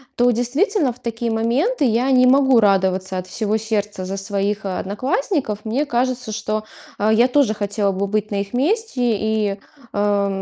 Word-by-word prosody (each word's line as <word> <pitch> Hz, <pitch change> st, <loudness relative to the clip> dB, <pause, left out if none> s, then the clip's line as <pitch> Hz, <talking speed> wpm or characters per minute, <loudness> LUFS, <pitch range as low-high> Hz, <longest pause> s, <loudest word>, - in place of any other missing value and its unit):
то, 245 Hz, 0 st, +3 dB
действительно, 270 Hz, -, +1 dB
в 250 Hz, -, -21 dB
такие 235 Hz, -1 st, -3 dB
моменты 250 Hz, -, 0 dB
я 245 Hz, +2 st, +2 dB
не 255 Hz, -1 st, +5 dB
могу 265 Hz, -2 st, +5 dB
радоваться 190 Hz, -2 st, +1 dB
от 185 Hz, 0 st, -5 dB
всего 215 Hz, +2 st, -1 dB
сердца 210 Hz, -3 st, -3 dB
за 195 Hz, -, -4 dB
своих 200 Hz, +1 st, -2 dB
одноклассников. 215 Hz, -, -2 dB
Мне 255 Hz, +7 st, 0 dB
кажется, 250 Hz, -2 st, -1 dB
что, 215 Hz, 0 st, -3 dB, 0.3 s
а, 210 Hz, +2 st, +2 dB
я 235 Hz, +3 st, +5 dB
тоже 260 Hz, -4 st, +2 dB
хотела 205 Hz, -1 st, -1 dB
бы 195 Hz, +1 st, -2 dB
быть 215 Hz, +1 st, -2 dB
на 205 Hz, -, -2 dB
их 200 Hz, +2 st, -5 dB
месте 360 Hz, -, 0 dB, 0.2 s
и, 215 Hz, -2 st, -1 dB, 0.4 s
э, 205 Hz, -1 st, +1 dB
220 Hz, 165 wpm, -20 LUFS, 205-255 Hz, 0.4 s, не